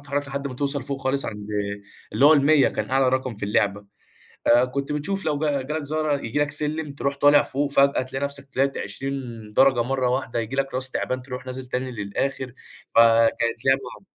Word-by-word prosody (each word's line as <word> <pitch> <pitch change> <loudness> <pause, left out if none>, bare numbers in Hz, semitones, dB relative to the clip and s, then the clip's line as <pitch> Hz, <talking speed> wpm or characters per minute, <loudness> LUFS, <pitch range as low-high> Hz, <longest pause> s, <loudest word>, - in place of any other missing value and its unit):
تتحرّك 145 0 -3
لحد 140 +1 -4
ما 125 - -8
توصَل 140 0 0
فوق 135 +1 -5
خالص 135 0 0
عند 105 -1 -7 0.7
اللي 140 - +2
هو 155 - +8
ال100 145 0 +4
كان - - -4
أعلى 135 0 +3
رقم 130 -3 -1
في 100 - -4
اللعبة، 100 0 0 0.6
آآ 120 +2 +5
كنت 140 +3 -4
بتشوف 195 +7 -3
لو 150 -2 0
جا 145 -3 0
جه 140 - -6
لك 155 -1 -2
زهرة 155 0 -1
ييجي 115 +6 -3
لك 145 0 +1
سلِّم 150 0 +2
ترُوح 140 0 -3
طالع 145 +1 +5
فوق 140 +1 -2
فجأة 140 -1 +3
تلاقي 135 +2 -4
نفسك 140 -1 -3
طلَعت 135 +1 0
20 135 0 -4 0.4
درجة 130 0 +4
مرّة 130 0 -1
واحدة، 125 -2 -1
ييجي 115 +4 -5
لك 135 -1 -1
راس 130 0 +4
تِعبان 130 0 -3
ترُوح 125 0 -8
نازل 130 0 -5
تاني 130 +1 -3
للآخِر، 125 +5 -3 0.4
فكانت 115 +1 +3
لعبة 135 +1 0
135 Hz, 200 wpm, -23 LUFS, 125-140 Hz, 0.7 s, هو